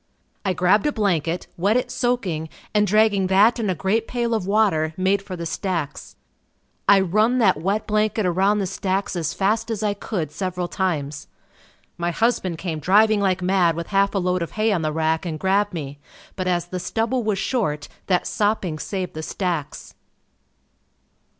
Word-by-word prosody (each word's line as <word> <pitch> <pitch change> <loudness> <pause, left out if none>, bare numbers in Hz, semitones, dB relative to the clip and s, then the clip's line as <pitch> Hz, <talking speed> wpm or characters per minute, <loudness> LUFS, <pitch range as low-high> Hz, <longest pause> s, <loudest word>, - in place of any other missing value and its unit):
I 190 - 0
grabbed 185 - +3
a - - +2
blanket, 180 - 0
wet 200 +7 +2
it 250 - -2
soaking 190 -11 -1 0.2
and 210 -1 +3
dragging 210 -2 +3
that 205 +6 +4
and 215 -3 -1
a 185 - 0
great 200 +8 0
pail 235 -1 -1
of 215 -5 -1
water, 190 -7 +2
made 190 +2 +2
for 195 -2 -7
the 170 -1 -5
stacks. 165 -4 -4 0.7
I 200 - +8
run 215 +7 +2
that 190 -10 +3
wet 200 +5 0
blanket 215 0 +1
around 190 +4 +2
the 200 - 0
stacks 195 0 -2
as 160 -4 -2
fast 215 +4 0
as 220 -2 -3
I 210 -1 +1
could 185 -7 -4
several 180 +2 -3
times. 150 -7 -2 0.7
My 170 0 0
husband 190 -3 0
came 160 -3 -4
driving 210 +6 +4
like 185 -2 +1
mad 180 -3 +3
with 170 0 -5
half 200 0 +2
a - - +2
load 180 -1 0
of 170 - -4
hay 215 +1 +1
on 185 -5 +1
the 155 -1 -1
rack 160 +1 0
and 160 -3 -4
grabbed 200 +4 +2
me 145 -5 -6 0.4
but 185 -1 -3
as 175 -2 +1
the 180 +1 -5
stubble 230 +6 -1
was 210 -2 0
short 155 - -1 0.2
that 180 -2 +2
sopping 205 -7 -1
saved 185 +1 -4
the 155 - -5
stacks. 165 -3 -4
190 Hz, 180 wpm, -22 LUFS, 170-210 Hz, 0.7 s, I